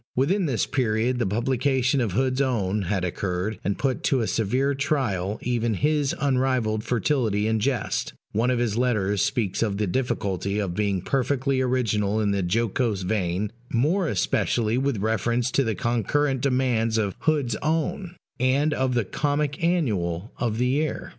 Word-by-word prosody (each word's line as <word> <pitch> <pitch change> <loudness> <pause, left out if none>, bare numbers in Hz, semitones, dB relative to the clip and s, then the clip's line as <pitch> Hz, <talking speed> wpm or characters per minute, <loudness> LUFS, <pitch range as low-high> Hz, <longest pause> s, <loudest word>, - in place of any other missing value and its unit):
Within 170 +8 +2
this 125 -6 0
period 120 -1 0
the 120 - +1
publication 130 +4 +1
of 110 -6 -1
Hood's 130 +3 +1
Own 105 -6 0
had 95 -3 0
occurred, 90 +3 -2
and 100 +1 -1
put 135 -3 -1
to 135 -3 +2
a - - 0
severe 125 +7 +1
trial 120 - -1
even 120 -2 0
his 150 +3 +1
unrivalled 130 -6 +1
fertility 115 -3 0
in 110 0 +1
jest: 130 +3 -1 0.2
one 115 +4 +1
of 125 - +1
his 120 -3 0
letters 105 -5 +1
speaks 105 -6 0
of 105 -3 0
the 105 - 0
difficulty 100 -3 -1
of 100 -4 -1
being 100 -2 -1
perfectly 135 +1 0
original 110 -5 +1
in 105 -2 +1
the 100 -1 0
jocose 105 +2 0
vein, 95 +1 -1 0.2
more 160 +10 +2
especially 110 +1 +1
with 135 -1 0
reference 115 +4 0
to 140 - +2
the 110 -3 -1
concurrent 125 +5 0
demands 125 -4 +1
of 100 -3 -1
Hood's 145 -8 +1
Own, 170 +4 -2 0.2
and 140 +4 +2
of 130 -2 0
the 120 -4 +1
Comic 145 - -1
Annual 105 - 0
of 115 -3 -1
the 125 - +1
year. 145 +4 -1
120 Hz, 160 wpm, -25 LUFS, 105-135 Hz, 0.2 s, Within